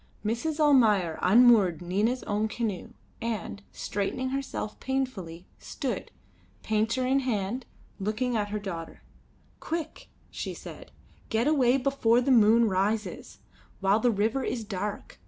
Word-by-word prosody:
Mrs. 265 +9 -1
Almayer 220 - +4
unmoored 210 -5 +5
Nina's 205 +8 0
own 210 +1 0
canoe 220 -4 -4 0.3
and, 225 -3 -4
straightening 210 +6 -3
herself 270 -5 -4
painfully, 210 -11 -3
stood, 245 -8 -4 0.5
painter 225 +4 0
in 265 +2 +3
hand, 240 -1 -2 0.3
looking 220 +5 -1
at 205 -2 -1
her 210 - -2
daughter. 175 -5 -7 0.6
"Quick," 320 -1 -5 0.2
she - - -5
said; - - -10 0.4
"get 225 +2 +1
away 270 -4 +4
before 255 -3 +2
the 260 +2 +1
moon 230 -1 +6
rises, 210 +3 -2 0.4
while 195 +2 +3
the 245 - +3
river 225 +5 0
is 230 - -2
dark. 205 0 -5
225 Hz, 125 wpm, -28 LUFS, 205-255 Hz, 0.6 s, moon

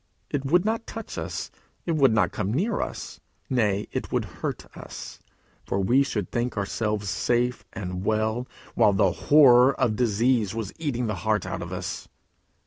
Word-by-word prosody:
It 140 -2 -2
would 175 +7 +3
not 225 +1 -1
touch 225 0 -7
us. - - -5 0.3
It 170 - 0
would 135 -5 +5
not 105 -5 +2
come 95 - -2
near 200 - 0
us. - - -6 0.3
Nay, 105 -5 +1
it - - -4
would - - 0 0.2
hurt - - -3
us, - - -9 0.4
for 100 - -2
we 120 +8 +4
should 105 -9 -2
think 120 -1 -2
ourselves 105 +1 -1
safe 120 +5 0
and 90 -1 -5
well, 110 +4 0 0.3
while 110 -3 +4
the 95 -2 +3
horror 130 - +6
of 120 -5 +2
disease 115 -1 +1
was 110 -4 -4
eating 130 -6 -1
the 105 -3 -2
heart 110 -1 +1
out - - -4
of - - -6
us. - - -5
115 Hz, 170 wpm, -26 LUFS, 105-130 Hz, 0.4 s, horror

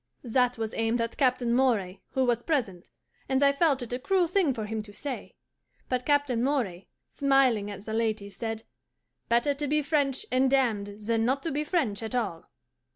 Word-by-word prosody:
That 250 0 +1
was 225 -1 -3
aimed 225 +1 0
at 230 0 -2
Captain 250 -3 +2
Moray, 220 -8 +1
who 265 -1 +2
was 240 -1 +1
present, 230 - -2 0.4
and 265 +1 +2
I 280 0 +5
felt 280 -3 +2
it 245 - -6
a 250 - -2
cruel 360 +6 +2
thing 360 -4 +2
for 225 -4 -4
him 220 +1 -3
to 210 -1 -11
say; 270 +4 -6 0.5
but 250 -1 -1
Captain 285 -5 +2
Moray, 230 -10 -1 0.2
smiling 265 -7 +2
at 200 0 -8
the 220 - -4
ladies, 215 -3 -1
said, 225 -1 -4 0.7
"Better 240 +5 +3
to 290 +1 -3
be 300 +1 +1
French 285 +3 0
and 260 +1 +3
damned 215 -6 0
than 225 0 +1
not 265 +4 0
to 330 - -2
be 295 +2 -1
French 285 - 0
at 225 +2 -4
all." 200 -9 -3
245 Hz, 190 wpm, -28 LUFS, 220-275 Hz, 0.7 s, I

